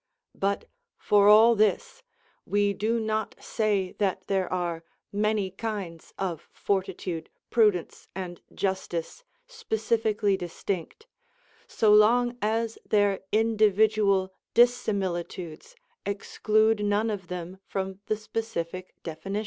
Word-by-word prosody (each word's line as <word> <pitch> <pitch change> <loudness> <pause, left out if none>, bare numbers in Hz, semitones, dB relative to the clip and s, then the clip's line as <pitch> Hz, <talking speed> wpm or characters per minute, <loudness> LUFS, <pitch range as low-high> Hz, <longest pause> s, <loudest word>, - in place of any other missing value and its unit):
But, 200 +1 -1 0.3
for 205 -1 +4
all 220 +3 +8
this, 235 - +1 0.4
we 205 0 +1
do 225 +4 0
not 220 -1 -2
say 205 -5 0
that 195 -3 0
there 190 -2 -1
are 175 -2 -2 0.3
many 210 -2 0
kinds 195 -5 -5
of 175 -5 -4
fortitude, 185 -4 -2 0.2
prudence, 210 -7 +2
and 180 -2 -6
justice 190 - -3 0.2
specifically 220 - 0
distinct, 180 - -5 0.6
so 215 -2 +3
long 240 +3 +5
as 225 +2 -1
their 205 -2 +2
individual 215 -3 +3 0.2
dissimilitudes 190 -8 0 0.3
exclude 215 +2 +1
none 205 +2 +1
of 190 -4 -5
them 180 +1 -6
from 190 0 -4
the 215 - 0
specific 185 -5 -5
definitions. 195 +5 -4
205 Hz, 105 wpm, -27 LUFS, 185-220 Hz, 0.6 s, all